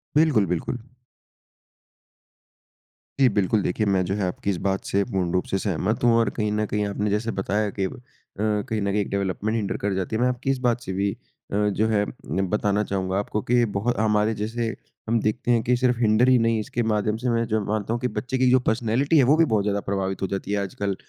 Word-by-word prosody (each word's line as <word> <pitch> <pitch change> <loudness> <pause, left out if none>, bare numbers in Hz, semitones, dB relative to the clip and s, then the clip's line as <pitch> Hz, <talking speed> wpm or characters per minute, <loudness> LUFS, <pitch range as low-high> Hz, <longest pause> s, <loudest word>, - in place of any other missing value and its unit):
बिल्कुल, 150 -10 +4
बिल्कुल। 90 +8 -2 2.4
जी, 135 - +6
बिल्कुल, 100 +1 +1
देखिए, 105 +5 -1
मैं 95 -2 +2
जो 95 - -1
है 100 -3 -1
आपकी 95 +2 -3
इस 95 - 0
बात 95 0 -1
से 100 0 +1
पूर्ण 95 -6 -1
रूप 90 - +1
से 95 - -1
सहमत 105 +4 -1
हूँ। 120 -1 +5
और 115 - +3
कहीं 105 -1 0
न 105 0 0
कहीं 105 0 -1
आपने 105 +1 -2
जैसे 110 +3 0
बताया 105 +2 -1
कि 95 - +2
अ, - - -3 0.5
कहीं 105 0 -1
न 100 - 0
कहीं 105 - +1
एक - - -4
डेवलपमेंट 100 +3 -1
हिन्डर 105 -4 -1
कर 100 -1 -1
जाती 95 +3 -2
है, 115 - 0
मैं 125 - +4
आपकी 125 +2 -3
इस 135 - 0
बात 120 -1 +1
से 95 -4 -5
भी 100 +1 0 0.4
अ, - - -2
जो 110 +2 +1
है 105 -2 +2 0.4
बताना 105 0 +1
चाहूँगा 95 -1 -2
आपको 105 +1 -2
कि 120 -1 +4
बहुत 120 +2 0
हमारे 105 0 +2
जैसे 115 +2 -3 0.3
हम 115 0 +3
देखते 120 +3 0
हैं 115 -2 +3
कि 125 +1 +2
सिर्फ 125 -1 +2
हिन्डर 115 +2 +4
ही 130 - +6
नहीं, 115 -1 +2
इसके 120 +2 -2
माध्यम 105 0 0
से 125 +1 -2
मैं 115 0 +1
जो 110 -1 +1
मानता 110 +1 -1
हूँ 120 - -1
कि 125 - +1
बच्चे 130 +1 -3
की 130 -1 +3
जो 130 - +6
पर्सनैलिटी 125 +7 +2
है, 135 - +6
वो 140 +5 +5
भी 165 - +5
बहुत 110 -6 +1
ज़्यादा 100 0 0
प्रभावित 95 -1 -2
हो 95 - 0
जाती 100 +1 -4
है 105 - +1
आजकल। 100 0 -3
105 Hz, 230 wpm, -24 LUFS, 100-115 Hz, 2.4 s, जी